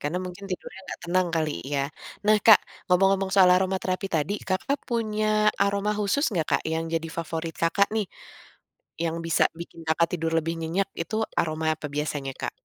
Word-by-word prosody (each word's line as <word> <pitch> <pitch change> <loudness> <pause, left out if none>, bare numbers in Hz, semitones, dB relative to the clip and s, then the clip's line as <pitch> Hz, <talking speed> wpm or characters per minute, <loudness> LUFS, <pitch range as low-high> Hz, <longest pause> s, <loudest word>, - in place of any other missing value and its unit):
karena 150 +5 -2
mungkin 180 +2 -8
tidurnya 185 +1 -6
gak - - -6
tenang 180 +1 +2
kali 155 -2 0 0.2
ya? 140 -1 0 0.4
Nah 215 0 +6
Kak 220 -3 +10 0.3
ngomong-ngomong 195 +1 +3
soal 185 -2 +7
aroma 190 +1 +2
terapi 185 +1 -2
tadi 160 +3 0
Kakak 195 +10 -1
punya 215 -2 +1
aroma 200 +1 +1
khusus 210 +9 +1
nggak 165 -4 0
Kak - - +2
yang 165 0 -1
jadi 165 0 -1
favorit 165 0 -3
Kakak 200 +4 +3
nih? 215 -4 0 1.0
Yang 165 0 -1
bisa 165 - +3
bikin 165 0 -10
Kakak 165 +1 +3
tidur 165 -1 -2
lebih 165 +1 -1
nyenyak 175 +5 -1
itu 170 +6 -4 0.2
aroma 160 0 0
apa 150 - -8
biasanya 145 -2 -2
Kak? - - -2
180 Hz, 175 wpm, -26 LUFS, 165-200 Hz, 1.0 s, Kak